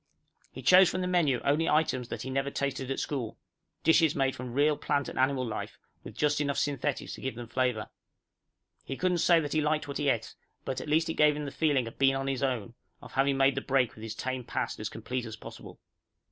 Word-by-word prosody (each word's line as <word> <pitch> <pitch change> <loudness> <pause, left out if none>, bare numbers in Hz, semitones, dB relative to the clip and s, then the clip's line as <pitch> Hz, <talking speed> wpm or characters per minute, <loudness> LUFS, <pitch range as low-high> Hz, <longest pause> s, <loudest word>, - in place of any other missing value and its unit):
He - - -9
chose 185 0 +7
from 185 - -2
the 180 - -1
menu 165 -9 +2
only 150 +4 +2
items 140 -5 +1
that - - -5
he 130 - -5
never 135 +1 0
tasted 135 -2 -3
at 135 - -2
school 130 -7 -3 0.5
dishes 160 -2 +4
made 135 -1 +1
from 125 0 -6
real 150 +2 +3
plant 145 -1 -1
and - - -5
animal 130 -1 +2
life, 115 - -5 0.3
with - - -10
just 150 0 +2
enough 140 -1 -1
synthetics 145 -1 -1
to - - -9
give 130 -2 -3
them 120 0 -6
flavor. 125 -3 0 1.0
He 135 - -5
couldn't 180 -1 +1
say 170 0 +5
that 145 -2 -3
he 155 - +2
liked 150 0 0
what 140 - -4
he 145 -1 +2
ate, 115 -3 -1 0.3
but 130 - -3
at - - -7
least 160 +2 +3
it - - 0
gave 150 -1 +5
him 150 - -4
the 140 - -5
feeling 140 -6 +1
of 115 - -10
being 135 0 +4
on 135 0 -2
his 135 -1 -2
own, 120 -5 -1 0.3
of - - -13
having 135 0 +2
made 135 0 +4
the 135 - -2
break 135 -3 +1
with 110 - -13
his 110 -1 -6
tame 130 +1 -3
past 115 - -3
as 105 0 -3
complete 125 +3 -4
as 110 -1 -7
possible. - - -11
135 Hz, 235 wpm, -29 LUFS, 130-150 Hz, 1.0 s, chose